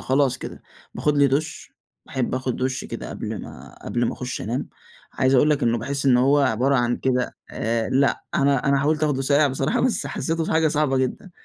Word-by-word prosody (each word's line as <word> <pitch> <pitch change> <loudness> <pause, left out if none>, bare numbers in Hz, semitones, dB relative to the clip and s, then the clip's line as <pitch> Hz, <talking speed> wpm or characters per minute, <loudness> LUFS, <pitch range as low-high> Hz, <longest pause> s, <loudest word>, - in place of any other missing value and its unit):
خلاص 135 -1 +1
كده. - - -8 0.3
باخُد 150 -1 0
لي 140 - +6
دُش، 145 +3 -2 0.3
باحب 130 -2 -2
آخُد 130 -1 -2
دُش 130 0 -2
كده - - -7
قبل - - -5
ما - - -11
قبل - - -1
ما - - -1
أخُش - - -5
أنام. - - -3 0.4
عايز 130 +1 +2
أقول 145 +4 +4
لك 150 -1 +1
إنه 120 0 +2
باحِس 140 +4 -3
إن 130 -2 +6
هو 135 +4 +4
عبارة 135 0 +2
عن 120 -1 +1
كده 125 -1 -1
آآ 115 0 -1
لأ، 135 +1 +1
أنا 140 -1 +2
أنا 140 0 +3
حاولت 150 +2 0
آخدُه 140 -3 0
ساقع 145 +2 +3
بصراحة، 135 +1 0
بس 225 - 0
حسّيته 160 +3 -2
حاجة 160 0 +3
صعبة 145 -2 +1
جدًا. 130 +8 -3
135 Hz, 200 wpm, -23 LUFS, 130-145 Hz, 0.4 s, لي